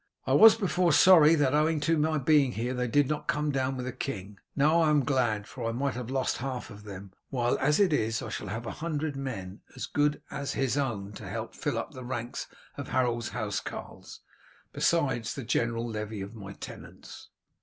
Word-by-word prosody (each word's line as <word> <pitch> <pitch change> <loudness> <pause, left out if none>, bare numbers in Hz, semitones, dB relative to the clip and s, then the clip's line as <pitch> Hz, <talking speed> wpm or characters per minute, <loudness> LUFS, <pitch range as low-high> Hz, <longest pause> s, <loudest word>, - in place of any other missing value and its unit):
I - - +1
was 220 0 +9
before 180 -5 +1
sorry 165 0 +7
that, 145 -4 +2
owing 155 +1 +2
to 160 +3 +2
my 155 0 +1
being 140 -2 +3
here, 120 +3 -2
they 125 -1 -1
did 145 +3 +3
not 150 +1 -3
come 150 0 0
down 135 -1 -1
with 125 - -4
the 130 - -3
king; 100 -6 -6 0.2
now 155 +4 +4
I 160 - +3
am 145 -3 +3
glad, 120 -7 +1
for 115 +1 -5
I - - -3
might 135 +3 -1
have 125 -1 -6
lost 130 -1 0
half 125 -1 -5
of 105 0 -12
them, 100 -1 -9 0.2
while 120 -2 +1
as 150 +5 +2
it 190 -6 +4
is 115 -4 0
I 120 - -6
shall - - -5
have 115 +2 -5
a - - -4
hundred 155 -2 -3
men 110 -8 -6
as - - -4
good 145 0 0
as 140 0 -3
his 135 -1 0
own 110 -8 -2
to - - -8
help - - -4
to - - -16
fill - - -1
up - - -4
the 130 - -9
ranks 120 -1 -4 0.3
of 140 - -5
Harold's 120 -2 0
housecarls, - - -6 0.5
besides 135 -9 +1
the 135 - -5
general 115 0 0
levy 110 -2 -5
of 100 +3 -7
my 100 -3 -9
tenants." - - -11
130 Hz, 210 wpm, -28 LUFS, 115-150 Hz, 0.5 s, was